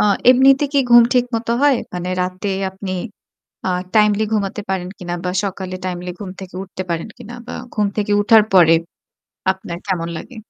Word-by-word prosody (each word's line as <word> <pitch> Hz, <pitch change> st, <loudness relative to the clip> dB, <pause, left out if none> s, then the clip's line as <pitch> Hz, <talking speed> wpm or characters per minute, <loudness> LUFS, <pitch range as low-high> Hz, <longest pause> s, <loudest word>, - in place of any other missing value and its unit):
আ -, -, +4 dB, 0.3 s
এমনিতে 270 Hz, +3 st, +5 dB
কি 280 Hz, -, +3 dB
ঘুম 240 Hz, 0 st, +9 dB
ঠিক 245 Hz, -1 st, +4 dB
মত 230 Hz, +1 st, -3 dB
হয়? 285 Hz, -3 st, +5 dB, 0.2 s
মানে 180 Hz, 0 st, -4 dB
রাতে 185 Hz, +2 st, -4 dB, 0.2 s
আপনি 190 Hz, 0 st, -6 dB, 0.7 s
আ -, -, +1 dB, 0.3 s
টাইমলি 210 Hz, 0 st, +4 dB
ঘুমাতে 205 Hz, 0 st, -1 dB
পারেন 180 Hz, -1 st, -2 dB
কিনা 175 Hz, -1 st, -4 dB
বা 180 Hz, -, 0 dB
সকালে 190 Hz, -1 st, -4 dB
টাইমলি 180 Hz, 0 st, -4 dB
ঘুম 195 Hz, -3 st, -6 dB
থেকে 185 Hz, -1 st, -10 dB
উঠতে 185 Hz, 0 st, -6 dB
পারেন 165 Hz, +5 st, -2 dB
কিনা 240 Hz, 0 st, -10 dB
বা -, -, -7 dB, 0.2 s
ঘুম 210 Hz, -2 st, +1 dB
থেকে 205 Hz, -1 st, 0 dB
উঠার 215 Hz, +1 st, +6 dB
পরে 165 Hz, -3 st, +7 dB, 0.8 s
আপনার 175 Hz, -2 st, -7 dB
কেমন 170 Hz, -3 st, -1 dB
লাগে? 250 Hz, -, -10 dB
195 Hz, 175 wpm, -19 LUFS, 180-220 Hz, 0.8 s, ঘুম